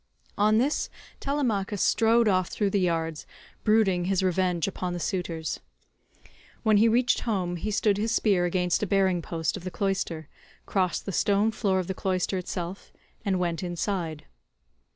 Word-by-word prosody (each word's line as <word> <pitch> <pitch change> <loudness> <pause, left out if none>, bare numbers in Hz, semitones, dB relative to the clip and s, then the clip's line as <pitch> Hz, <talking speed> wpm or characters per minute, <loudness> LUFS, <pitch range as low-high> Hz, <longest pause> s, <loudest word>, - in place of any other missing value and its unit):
On 215 +1 +3
this 270 +6 +1 0.3
Telemachus 225 -8 -1
strode 230 +3 +4
off 185 -3 +2
through 205 -2 -1
the 200 - +2
yards, 165 -3 -1 0.4
brooding 205 -5 +3
his 190 0 +1
revenge 180 -2 +1
upon 180 -2 -3
the 175 - -3
suitors. 165 -2 -3 1.0
When 215 -1 +4
he 220 +3 +5
reached 240 +2 +3
home 185 -6 -1
he 210 +6 -3
stood 205 -1 +2
his 220 +2 0
spear 195 -6 +2
against 180 0 +1
a 210 - 0
bearing 190 -2 +2
post 160 -2 -2
of 185 - -10
the 185 - -3
cloister, 185 -5 -2 0.4
crossed 185 -3 0
the 195 - -3
stone 205 +4 +2
floor 200 -4 0
of 185 - 0
the 190 - -3
cloister 185 0 -1
itself, 180 +1 -5 0.3
and 195 -3 +1
went 170 -2 -1
inside. 175 -3 -3
190 Hz, 160 wpm, -27 LUFS, 175-210 Hz, 1.0 s, he